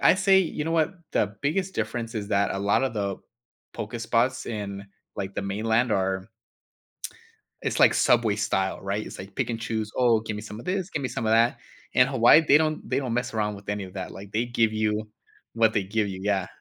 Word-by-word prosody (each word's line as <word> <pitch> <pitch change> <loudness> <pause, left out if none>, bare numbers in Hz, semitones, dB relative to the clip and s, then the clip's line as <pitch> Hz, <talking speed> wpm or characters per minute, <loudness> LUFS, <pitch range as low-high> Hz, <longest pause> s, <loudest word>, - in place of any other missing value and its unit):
I - - +6
say 195 0 +4
you 165 -4 -1
know 165 - -2
what? 165 +2 +1 0.2
The 100 0 0
biggest 185 +6 -1
difference 115 -1 -3
is 105 -2 -4
that 100 -1 +1
a - - -3
lot 100 +6 +2
of 130 -4 -2
the 100 -2 -2 0.6
poke 110 +3 -5
spots 120 +3 +1
in, 100 -3 -5 0.3
like, 95 0 -4
the - - -2
Mainland 110 +4 0
are 95 0 -1 1.3
it's - - -1
like - - +6
Subway 115 -4 +3
style, 95 -2 -1
right? 100 +2 -2
It's - - -9
like 95 +1 -9
pick - - -1
and 115 -1 -4
choose, 110 -2 -3
"Oh, 120 -3 +4
give 110 -1 -5
me 105 - -6
some 110 0 -8
of - - -13
this, 190 0 -2
give 150 - -3
me 130 - -1
some 115 - -3
of 110 - +2
that." 115 +2 +3 0.4
In 125 0 +6
Hawaii, 135 +4 +6
they 145 +2 +7
don't 155 -1 -1
they - - +1
don't 130 -4 -2
mess 120 +2 -1
around 105 -2 -1
with 100 0 -14
any 105 -1 -2
of 95 0 -12
that, 95 -1 -5
like, 100 +1 -10
they 115 +3 +1
give 115 -2 +1
you 110 0 -1 0.5
what 115 -1 +3
they 105 - +1
give 105 +2 -1
you, 95 -1 -6
yeah. 100 -2 0
110 Hz, 230 wpm, -26 LUFS, 100-125 Hz, 1.3 s, they